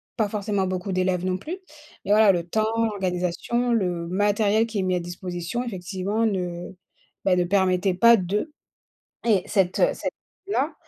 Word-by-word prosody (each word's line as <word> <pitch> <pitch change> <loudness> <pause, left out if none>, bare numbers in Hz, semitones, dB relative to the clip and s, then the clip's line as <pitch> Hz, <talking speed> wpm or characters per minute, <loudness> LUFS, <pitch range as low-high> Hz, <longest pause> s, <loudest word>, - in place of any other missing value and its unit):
pas 220 -4 0
forcément 205 -2 -1
beaucoup 185 +1 -3
d'élèves, 185 -1 0
non 185 0 0
plus. 330 - -5 0.5
Mais 200 - -1
voilà, 210 -1 +7
le 175 -2 -1
temps, 220 +4 +1
l'organisation, 195 +4 -1
le 180 -6 0
matériel 205 +4 +2
qui 225 -2 -5
est - - 0
mis 185 0 0
à - - 0
disposition, 175 +5 -4
effectivement 190 0 -3
ne, 180 -4 -3 0.6
bah 185 - +4
ne 180 - +2
permettait 185 0 +2
pas 235 +5 +7
de 205 - -2 0.7
et 205 -6 +3
cette, 190 -4 +1
heu, - - +5
cette - - -4 0.3
là, 310 -5 0
195 Hz, 165 wpm, -24 LUFS, 180-220 Hz, 0.7 s, voilà